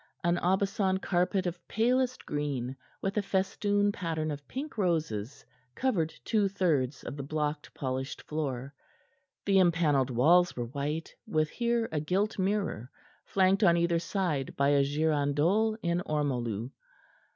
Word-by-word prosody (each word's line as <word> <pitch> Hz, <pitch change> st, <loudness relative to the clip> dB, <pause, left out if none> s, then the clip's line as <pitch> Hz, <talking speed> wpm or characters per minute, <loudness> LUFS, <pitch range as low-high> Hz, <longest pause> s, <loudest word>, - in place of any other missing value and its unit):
An 170 Hz, +1 st, +2 dB
Aubusson 190 Hz, +1 st, +1 dB
carpet 185 Hz, +1 st, +1 dB
of 175 Hz, -1 st, -5 dB
palest 250 Hz, +3 st, +1 dB
green, 140 Hz, -4 st, -2 dB, 0.3 s
with 195 Hz, +2 st, -1 dB
a -, -, +4 dB
festoon 205 Hz, +1 st, +1 dB
pattern 160 Hz, -5 st, -2 dB
of 145 Hz, -2 st, -7 dB
pink 280 Hz, +3 st, -5 dB
roses, 155 Hz, -, -1 dB, 0.3 s
covered 180 Hz, -12 st, 0 dB
two 210 Hz, -3 st, +2 dB
thirds 155 Hz, -9 st, 0 dB
of -, -, -6 dB
the -, -, -3 dB
blocked, 150 Hz, +1 st, -3 dB
polished 130 Hz, 0 st, -3 dB
floor. 140 Hz, -3 st, -3 dB, 0.7 s
The 195 Hz, -1 st, +4 dB
empanelled 160 Hz, -7 st, +3 dB
walls 165 Hz, +9 st, +4 dB
were 120 Hz, -, -2 dB
white, 145 Hz, +5 st, -4 dB
with 155 Hz, -1 st, +1 dB
here 235 Hz, -1 st, 0 dB
a 155 Hz, -, 0 dB
gilt 195 Hz, +8 st, 0 dB
mirror, 190 Hz, -, -1 dB, 0.4 s
flanked 195 Hz, +2 st, +3 dB
on 170 Hz, -3 st, +6 dB
either 170 Hz, 0 st, +2 dB
side 170 Hz, -6 st, -2 dB
by 140 Hz, 0 st, +3 dB
a 140 Hz, -1 st, +4 dB
girandole 155 Hz, +8 st, +1 dB
in 170 Hz, 0 st, +1 dB
ormolu. 125 Hz, -6 st, -1 dB
165 Hz, 140 wpm, -30 LUFS, 145-195 Hz, 0.7 s, on